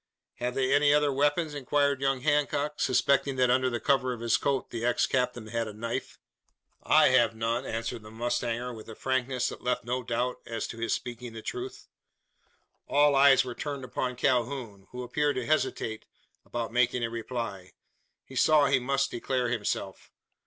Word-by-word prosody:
"Have 125 +1 -3
they 135 0 +1
any 145 0 +5
other 145 -1 +3
weapons?" 145 +3 +1
inquired 140 0 +1
young 135 -1 +1
Hancock, 150 0 0
suspecting 135 +2 +2
that 125 -1 +3
under 130 0 +3
the 120 -1 -2
cover 130 -2 +1
of 120 - -8
his 115 0 +2
coat 135 +2 -1
the 115 -1 -4
ex 120 0 +2
captain 125 -3 -1
had 115 0 -2
a 105 - -7
knife. 115 +2 -4 0.6
"I - - +5
have 120 -3 +3
none," 115 +3 -1
answered 115 0 -3
the 110 - -12
mustanger, 120 +1 -2
with 110 -1 -11
a 110 - -8
frankness 130 0 -1
that - - -9
left 125 0 -1
no 125 +1 -1
doubt 125 +1 -2
as 115 -1 -3
to 115 - -8
his 115 - -2
speaking 120 -1 -7
the 110 - -8
truth. 385 +1 -6 1.0
All 145 0 +4
eyes 135 -1 +6
were 125 - -5
turned 140 +1 -5
upon 125 0 -3
Calhoun, 120 -5 -1
who 125 0 -6
appeared 145 +4 0
to 125 - -2
hesitate 125 -6 -1 0.4
about 115 -1 -4
making 125 0 +2
a 115 - 0
reply. 115 -5 -5 0.5
He 130 - -13
saw 150 +3 +5
he 135 -1 +3
must 135 +2 0
declare 125 0 -1
himself. 115 -4 -3
125 Hz, 180 wpm, -28 LUFS, 115-135 Hz, 1.0 s, eyes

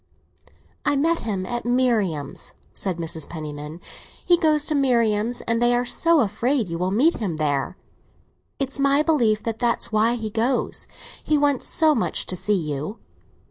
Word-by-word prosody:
"I 290 - +1
met 330 +4 +2
him 200 -4 -3
at 240 +4 -3
Marian's," 225 - 0 0.2
said 185 -4 -3
Mrs. 160 -2 -4
Penniman. 150 0 -7 0.5
"He 350 - +6
goes 310 -3 +2
to 310 - +1
Marian's, 235 -4 +1
and 230 0 -1
they 240 0 +4
are 245 +1 0
so 330 +6 +3
afraid 230 +1 0
you 170 0 -4
will 180 +1 0
meet 265 - +3
him 185 -8 -3
there. 145 -3 -1 0.8
It's 275 0 -3
my 280 +1 +3
belief 235 -10 +2
that 225 -1 -3
that's 235 0 0
why 220 +2 +2
he 220 -2 -5
goes. 235 +4 0 0.4
He 305 - +2
wants 285 -3 +1
so 315 -2 +4
much 235 - -1
to 185 - -4
see 210 +3 +1
you." 155 +5 -4
230 Hz, 165 wpm, -23 LUFS, 185-275 Hz, 0.8 s, He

